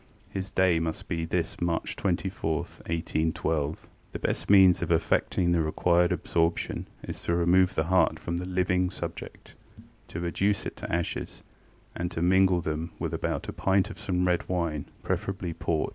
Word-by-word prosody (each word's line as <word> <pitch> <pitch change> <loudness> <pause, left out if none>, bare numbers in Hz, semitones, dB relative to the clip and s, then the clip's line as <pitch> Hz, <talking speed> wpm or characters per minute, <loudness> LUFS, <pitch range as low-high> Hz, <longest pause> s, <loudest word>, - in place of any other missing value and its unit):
His 95 0 -4
day 95 -3 +3
must 80 -1 -3
be 85 -2 -2
this 85 +1 -2
March 85 -1 -1
24, 90 -3 -1
1812. 80 -2 -2 0.3
ŌĆ£The - - -5
best - - -2
means 95 -3 +7
of 85 -1 -1
effecting 85 +2 +2
the 85 -1 +3
required 85 +2 +2
absorption 85 0 0 0.2
is - - -6
to 85 - 0
remove 90 +2 +4
the 80 - +2
heart 90 0 +3
from 85 0 -3
the 90 +1 -4
living 90 0 +1
subject, 95 - -7 0.5
to 85 - -6
reduce 100 +4 0
it - - -5
to - - -6
ashes, 85 0 -3 0.5
and 90 +1 -2
to 85 -1 -3
mingle 95 0 +4
them 80 +1 -3
with - - -3
about - - -2
a - - -4
pint 95 +2 +2
of - - -10
some 90 -1 0
red 90 -1 0
wine, 85 -5 -1 0.2
preferably 95 -3 -2
port. 80 -1 -1
85 Hz, 165 wpm, -28 LUFS, 80-95 Hz, 0.5 s, means